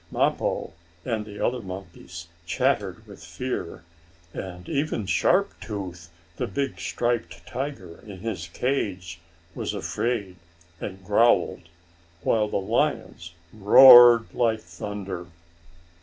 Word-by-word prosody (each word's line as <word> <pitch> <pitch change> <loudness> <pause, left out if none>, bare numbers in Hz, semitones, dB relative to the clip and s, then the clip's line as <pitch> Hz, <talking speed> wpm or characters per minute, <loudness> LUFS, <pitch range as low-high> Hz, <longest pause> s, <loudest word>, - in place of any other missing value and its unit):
Mappo - - -1 0.3
and 110 -3 -3
the 105 -1 -10
other 125 0 -1
monkeys 90 -3 -9 0.2
chattered - - -1
with - - -13
fear, 125 -10 -5 0.5
and 90 -2 -8
even 145 -8 -2
Sharp 200 - +2
Tooth, 90 -5 -7 0.3
the - - -2
big 135 -10 -3
striped 120 +8 -3
tiger, 130 - -6
in 95 -3 -11
his 110 -6 -4
cage, 90 -5 -3 0.3
was - - -4
afraid, 105 -6 -3 0.4
and 95 -1 -7
growled, 105 -5 +2 0.5
while 110 -1 +2
the - - -2
lions 85 -3 -2 0.2
roared 120 +2 +9
like 115 -3 +1
thunder. 95 +1 -7
100 Hz, 110 wpm, -25 LUFS, 90-120 Hz, 0.5 s, roared